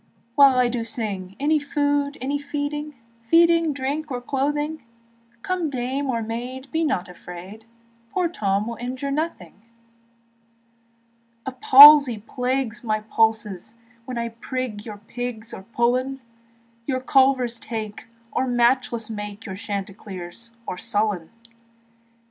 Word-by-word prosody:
While 275 -1 +6
I 250 -1 +4
do 240 -1 -2
sing, 200 -5 0
Any 300 +2 +2
food, 285 0 0
any 280 +3 -2
feeding, 295 +1 -4 0.3
Feeding, 335 +5 +4
drink, 285 +3 -3
or 250 -2 -3
clothing; 295 +4 -2 0.6
Come 360 -4 -1
dame 265 +2 -2
or 230 -3 -1
maid, 250 +4 -6
be 325 +1 0
not 265 - 0
afraid, 180 +4 -11 0.4
Poor 360 +7 0
Tom 205 - -1
will 235 0 -5
injure 255 +3 -4
nothing. 280 - -4 1.8
The 265 - -3
palsy 275 0 +9
plagues 250 +1 -2
my 215 -2 -1
pulses 220 -2 0 0.3
When 250 -1 -5
I 235 0 -2
prig 230 -2 -5
your 210 -2 -7
pigs 225 +1 -6
or - - -7
pullen, 245 +5 0 0.7
Your 260 -2 0
culvers 260 -3 +2
take, 220 -2 -6 0.2
or 260 - 0
matchless 240 -2 +2
make 210 -1 -7
Your 190 -3 -6
Chanticleer 195 -3 -6 0.3
or 180 - -5
Sullen. 205 -6 -1
245 Hz, 125 wpm, -23 LUFS, 220-280 Hz, 1.8 s, palsy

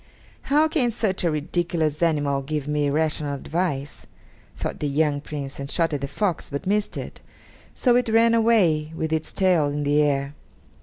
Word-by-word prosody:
"How 300 +3 +4
can 295 -6 +1
such 215 -5 -1
a 170 - +3
ridiculous 155 0 -1
animal 145 -4 +1
give 150 +1 -4
me 150 -1 0
rational 150 -1 0
advice?" 145 -1 -3 0.5
thought - - -4
the 150 - -1
young 145 0 +1
Prince, 140 -2 -6
and 140 0 -5
shot 165 0 0
at 145 - -2
the 140 - -2
fox, 175 +4 -2
but 140 0 -5
missed 205 +2 0
it, - - -7 0.5
so 245 -2 +3
it 245 -1 +2
ran 230 +1 +4
away 185 -10 +3
with 160 -1 -2
its 160 0 -1
tail 180 -6 +2
in 145 +1 -2
the 145 +1 +3
air. 140 -1 0
155 Hz, 175 wpm, -24 LUFS, 145-185 Hz, 0.5 s, How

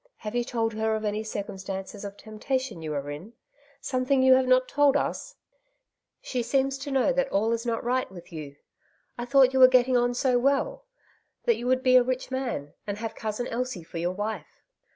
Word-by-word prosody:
Have 210 0 -6
you 240 0 +1
told 225 -2 -1
her 220 0 0
of 215 0 -3
any 210 +1 -1
circumstances 195 -1 -6
of 200 0 -7
tempta 220 +5 -2
tion 260 -10 -7
you 155 -1 -4
are 140 0 -3
in? 175 +11 -9 0.5
something 260 0 +1
you 260 0 +7
have 260 0 +3
not 255 0 +4
told 290 -1 +3
us? - - -3 0.9
She 250 - -2
seems 270 +3 0
to 285 +2 -6
know 270 0 +2
that 270 +1 0
all 215 +3 +1
is 230 +1 -2
not 230 -1 -1
right 255 -1 0
with 175 -2 -12
you. 150 -3 -7 0.6
I 240 - -5
thought 265 0 +5
you 265 - +2
were 255 - +10
getting 255 0 +3
on 245 0 +2
so 250 -1 +2
well, 280 - 0 0.6
that 470 - +3
you 245 - -5
would 255 0 +2
be 255 -1 +6
a 250 - +6
rich 255 +1 -3
man, 245 - -3
and 205 0 -3
have 225 +1 -4
Cousin 220 +2 -4
Elsie 245 -6 -3
for 165 +1 -7
your 175 +2 -1
wife 210 +3 -5
245 Hz, 210 wpm, -27 LUFS, 210-260 Hz, 0.9 s, were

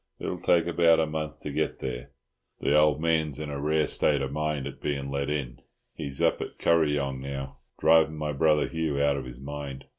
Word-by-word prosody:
It'll - - -4
take 85 -2 +3
about 85 -1 +4
a 80 - +3
month 75 0 -5
to 75 - -5
get - - -1
there. - - -5 0.5
The 70 - +2
old 75 -1 +4
man's 80 -3 0
in 75 -1 -5
a 70 -1 -4
rare 75 +1 +2
state 70 -2 +1
of 65 - -3
mind 75 -1 -2
at 70 - -8
being 70 -2 -2
let 70 +1 -2
in. 70 -5 -3 0.3
He's 70 -1 -4
up - - +2
at - - -6
Kuryong 75 -5 +1
now, 70 0 -6 0.2
driving 80 -1 +4
my 75 -1 -2
brother 75 +1 +3
Hugh 80 -3 -2
out 70 0 +3
of - - -5
his 60 0 -9
mind. 70 -1 -7
75 Hz, 205 wpm, -27 LUFS, 70-80 Hz, 0.5 s, about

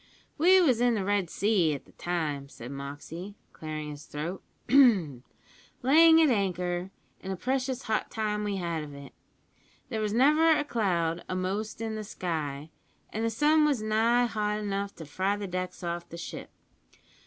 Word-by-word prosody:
"We 370 +4 +6
was 260 -10 +3
in 245 -1 +3
the 195 -3 -2
Red 200 -3 +1
Sea 190 -8 +2
at 140 - -9
the - - -20
time," 150 -6 -3
said 120 -1 -9
Moxey, 145 +8 -7 0.2
clearing 155 -1 -6
his 145 0 -10
throat, 165 +6 -5 0.3
"layin' 210 - +4 1.0
at 315 -4 +5
anchor, 180 -3 -1 0.3
and 190 - -5
a - - -2
precious 260 +4 -2
hot 220 -2 -1
time 210 -1 -2
we 205 -1 -1
had 170 -4 -2
of 145 -1 -9
it. 140 -1 -11 0.8
There 220 -4 -2
was 210 -1 -1
never 305 +7 +5
a - - 0
cloud 175 - 0
a'most 195 +4 -3
in 225 -1 -3
the 215 0 -4
sky, 155 -6 -4 0.4
and 220 - -2
the 230 - +2
sun 300 +7 +3
was 285 -7 +1
nigh 225 +3 +3
hot 210 -2 -1
enough 200 -1 -3
to 160 - -9
fry 190 +7 -1
the 205 - -4
decks 185 0 -5
off 170 0 -4
the 170 - -8
ship. 170 - -7
200 Hz, 170 wpm, -28 LUFS, 170-225 Hz, 1.0 s, We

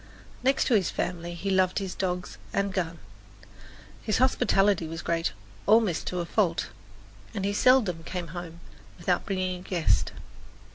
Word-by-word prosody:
Next 265 +2 +3
to 255 - +2
his 200 -5 +3
family 175 -1 -3
he 195 +3 -2
loved 185 -1 +3
his 195 -2 -2
dogs 180 -1 -3
and 200 -1 0
gun. 170 -3 -2 1.0
His 215 - 0
hospitality 200 -8 +3
was 165 +1 -6
great, 165 -5 0 0.4
almost 215 -5 +4
to 180 -1 -1
a - - -3
fault, 175 -2 +1 0.7
and 195 -2 -1
he 200 - 0
seldom 210 -8 +4
came 175 0 -5
home 170 0 -7 0.4
without 180 +1 0
bringing 185 -2 -1
a - - -11
guest. 180 -3 +1
185 Hz, 150 wpm, -27 LUFS, 170-200 Hz, 1.0 s, almost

